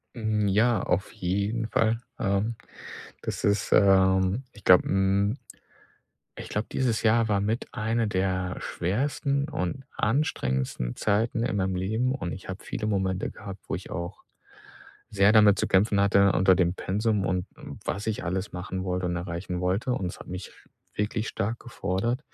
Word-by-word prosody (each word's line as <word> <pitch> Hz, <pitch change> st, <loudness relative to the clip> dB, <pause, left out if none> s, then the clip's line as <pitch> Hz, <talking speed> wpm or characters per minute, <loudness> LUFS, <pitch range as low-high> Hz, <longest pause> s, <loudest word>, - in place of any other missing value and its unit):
Mm, 110 Hz, -3 st, 0 dB
ja 110 Hz, +2 st, +3 dB
auf -, -, -1 dB
jeden 100 Hz, +5 st, -1 dB
Fall, 115 Hz, 0 st, +1 dB, 0.2 s
ähm. 100 Hz, +3 st, 0 dB, 0.7 s
Das -, -, -4 dB
ist, 100 Hz, -2 st, +1 dB
ähm, 95 Hz, +3 st, +4 dB
ich 105 Hz, -, -16 dB
glaube, 90 Hz, -, +6 dB
mm 100 Hz, +3 st, +2 dB, 1.0 s
ich -, -, -8 dB
glaube, 105 Hz, +1 st, -2 dB
dieses 120 Hz, -4 st, 0 dB
Jahr 115 Hz, 0 st, +3 dB
war 100 Hz, -2 st, +1 dB
mit 110 Hz, +4 st, -1 dB
eine 115 Hz, 0 st, 0 dB
der 95 Hz, -1 st, -1 dB
schwersten 140 Hz, -, -1 dB
und 135 Hz, -, -3 dB
anstrengendsten 65 Hz, -, 0 dB
Zeiten 110 Hz, +3 st, +1 dB
in 120 Hz, -, -1 dB
meinem 95 Hz, -1 st, 0 dB
Leben. 110 Hz, +8 st, 0 dB
Und 90 Hz, -10 st, -4 dB
ich 95 Hz, -, -9 dB
habe 95 Hz, +1 st, -6 dB
viele 105 Hz, -, -4 dB
Momente 95 Hz, -3 st, 0 dB
gehabt, 100 Hz, -3 st, -9 dB
wo -, -, -1 dB
ich 90 Hz, -, -7 dB
auch 85 Hz, -1 st, -5 dB, 0.9 s
sehr 100 Hz, 0 st, +4 dB
damit 105 Hz, -3 st, +6 dB
zu -, -, +1 dB
kämpfen 100 Hz, +2 st, +3 dB
hatte 100 Hz, 0 st, +5 dB
unter 95 Hz, 0 st, +4 dB
dem 90 Hz, -1 st, +2 dB
Pensum 105 Hz, +1 st, 0 dB
und 90 Hz, -1 st, -1 dB, 0.4 s
was 100 Hz, +2 st, -3 dB
ich 110 Hz, -2 st, -2 dB
alles 95 Hz, +3 st, -3 dB
machen 95 Hz, +1 st, -4 dB
wollte 90 Hz, -1 st, -1 dB
und 90 Hz, 0 st, -1 dB
erreichen 90 Hz, +1 st, -4 dB
wollte. 95 Hz, +8 st, 0 dB
Und 95 Hz, -, -2 dB
es 90 Hz, -, -6 dB
hat -, -, -11 dB
mich 90 Hz, +1 st, -7 dB
sch -, -, -22 dB, 0.3 s
wirklich 105 Hz, +1 st, -1 dB
stark 110 Hz, +2 st, -2 dB
gefordert. 115 Hz, +2 st, -2 dB
100 Hz, 165 wpm, -27 LUFS, 95-110 Hz, 1.0 s, glaube